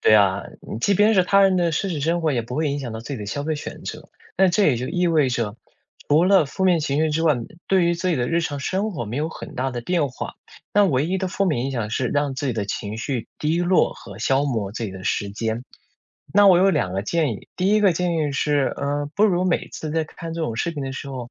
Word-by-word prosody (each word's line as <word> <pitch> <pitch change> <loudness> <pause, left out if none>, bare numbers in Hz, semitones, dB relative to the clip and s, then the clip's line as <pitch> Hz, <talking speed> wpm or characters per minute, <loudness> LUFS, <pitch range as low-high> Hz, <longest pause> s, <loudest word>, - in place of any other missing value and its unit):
对 - - +4
啊， 100 -2 +4 0.3
嗯， 110 - -5
即 200 - +3
便 210 +3 +4
是 185 - +5
他 200 +1 +4
人 190 -1 +4
的 170 -2 +2
奢 195 - 0
侈 155 -5 -3
生 170 +2 +1
活， 155 -2 +2
也 120 -2 0
不 125 +4 -6
会 155 -1 +1
影 145 0 -2
响 120 -4 -5
到 110 - -5
自 135 +5 -6
己 - - -6
的 105 - -6
消 145 +7 -3
费 155 0 -1
选 150 - -7
择。 - - -7 0.3
那 190 0 +5
这 195 +3 +2
也 140 - +4
就 125 +2 -4
意 180 0 +1
味 155 -5 +3
着， 115 -3 -2 0.5
除 155 +4 +5
了 195 -3 +5
负 190 +6 -3
面 175 -3 +4
情 145 0 -1
绪 160 0 +2
之 160 +2 0
外， 155 -3 +4 0.3
对 190 -2 +4
于 170 - +2
自 185 +2 -2
己 165 - +1
的 120 -1 0
日 170 +1 +2
常 145 -3 -3
生 195 +7 -1
活 120 -8 -4
没 115 +5 -5
有 155 +2 -1
很 - - -9
大 130 +1 -1
的 120 -1 -4
变 165 -2 +1
化。 130 - -7 0.4
那 205 0 +6
唯 140 -2 +1
一 190 +2 -1
的 190 - -2
负 195 - 0
面 130 -7 0
影 135 - -2
响 115 -4 -2
是 125 +2 0
让 145 -2 0
自 140 +2 -3
己 125 - 0
的 105 -2 -1
情 105 +1 -4
绪 125 -2 -3
低 160 +3 0
落 180 +1 +3
和 100 -2 -12
消 135 +4 +2
磨 110 -8 -2
自 115 - -5
己 100 - -4
的 95 0 -9
时 100 -1 -1
间。 110 +2 -3 0.7
那 205 -1 +7
我 180 -2 +7
有 195 +1 +5
两 90 - 0
个 95 +1 -1
建 155 0 0
议。 - - -11
第 185 +1 +1
一 215 +1 +4
个 195 -4 +5
建 175 0 -1
议 150 -3 0
是， 145 -1 +1
嗯， 145 +1 -1
不 210 - +4
如 185 -3 +2
每 180 -2 0
次 155 - -6
在 160 -1 +1
看 165 +1 -8
这 165 - -4
种 115 -7 -2
视 170 - -1
频 145 -3 -5
的 135 0 -4
时 140 +1 -6
候， 125 -3 -6
150 Hz, 305 characters per minute, -23 LUFS, 125-175 Hz, 0.7 s, 那